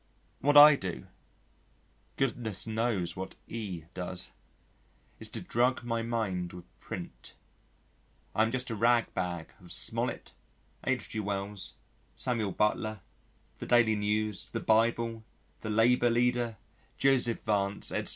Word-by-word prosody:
What 145 +2 +4
I 150 0 +11
do 95 -9 -5 1.1
(goodness 115 -6 -1
knows 110 -6 -1
what 95 +1 -6
E 100 -8 -5
does), 90 0 -3 0.9
is - - -4
to - - -4
drug 125 +2 +1
my 115 -1 -1
mind 100 -7 -2
with 90 -1 -10
print. - - -8 1.0
I - - +2
am 110 - +3
just 130 -1 -2
a - - -2
rag 115 +2 +3
bag 90 -3 -3
of 90 - -12
Smollett, - - 0 0.6
H.G. 110 - -1
Wells, 100 -1 -3 0.4
Samuel 115 -6 -1
Butler, 105 +1 0 0.6
the - - -6
Daily 120 -2 +5
News, 105 -1 -1
the - - -2
Bible, 115 0 +1 0.4
the 110 - -6
Labour 120 +3 +4
Leader, 120 -1 +1 0.4
Joseph 130 -4 +2
Vance, 100 -2 0
etc. - - -1
110 Hz, 125 wpm, -30 LUFS, 100-120 Hz, 1.1 s, I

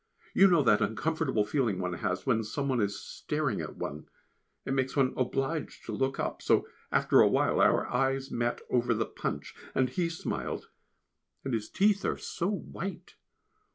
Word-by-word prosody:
You 195 - +7
know 170 -5 +4
that 105 -4 +4
uncomfortable 130 +2 0
feeling 115 -5 0
one 90 -1 -2
has 90 +1 -2
when 115 -4 +2
some 140 +6 -3
one 130 -4 +1
is 100 -1 -1
staring 150 -7 -2
at - - -6
one 75 +2 -6 0.6
it - - -1
makes 130 -1 0
one 135 -3 +3
obliged 135 +4 -2
to - - -5
look 135 0 -1
up - - -2
so - - +3 0.2
after - - +4
a - - +7
while - - +2
our - - +4
eyes 135 0 0
met 120 0 -1
over 120 -1 +2
the 110 +1 0
Punch, 70 - -4 0.2
and 130 -1 +3
he 170 +4 0
smiled, 160 - -4 0.7
and 135 - -3
his 110 -2 -2
teeth 200 0 +2
are - - 0
so 170 - -3
white. 195 -1 -5
130 Hz, 175 wpm, -30 LUFS, 110-150 Hz, 0.7 s, You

